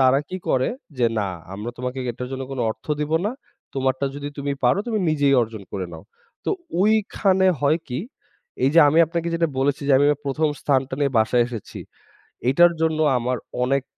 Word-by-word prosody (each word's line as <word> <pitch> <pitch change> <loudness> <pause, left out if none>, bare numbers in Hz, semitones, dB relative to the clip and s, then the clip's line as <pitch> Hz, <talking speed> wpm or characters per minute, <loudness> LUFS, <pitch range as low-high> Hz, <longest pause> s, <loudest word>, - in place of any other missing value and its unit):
তারা 130 +1 +5
কি 185 - -4
করে 130 0 +2 0.3
যে 120 - +4
না 100 -2 0 0.3
আমরা 105 +4 -5
তোমাকে 125 +1 -4
এটার 125 +2 -6
জন্য 135 0 -4
কোন 135 - -5
অর্থ 110 - -9
দিব 150 +1 -2
না। 215 - -1 0.4
তোমারটা 135 0 0
যদি 145 0 -5
তুমি 140 0 -1
পারো 125 +6 +4
তুমি 225 -3 0
নিজেই 145 -2 +3
অর্জন 110 -2 -6
করে 95 -2 -3
নাও। 80 +2 -10 0.4
তো - - 0 0.3
ওইখানে 200 -2 +3
হয় 150 +3 +3
কি, 125 0 -3 0.7
এই 135 - +4
যে 165 - +8
আমি 155 +3 +3
আপনাকে 170 +1 -2
যেটা 165 0 +2
বলেছি, 140 +1 +1
যে - - +5
আমি 140 - +4
আমার 145 -1 +1
১ম 145 +3 +1
স্থানটা 135 -1 +1
নিয়ে 140 -2 +1
বাসায় 120 +2 +3
এসেছি। 115 -5 -7 0.7
এটার 175 +6 +6
জন্য 160 -1 +1 0.2
আমার 125 +1 -1 0.3
অনেক 135 +1 +1
135 Hz, 190 wpm, -23 LUFS, 125-155 Hz, 0.7 s, যে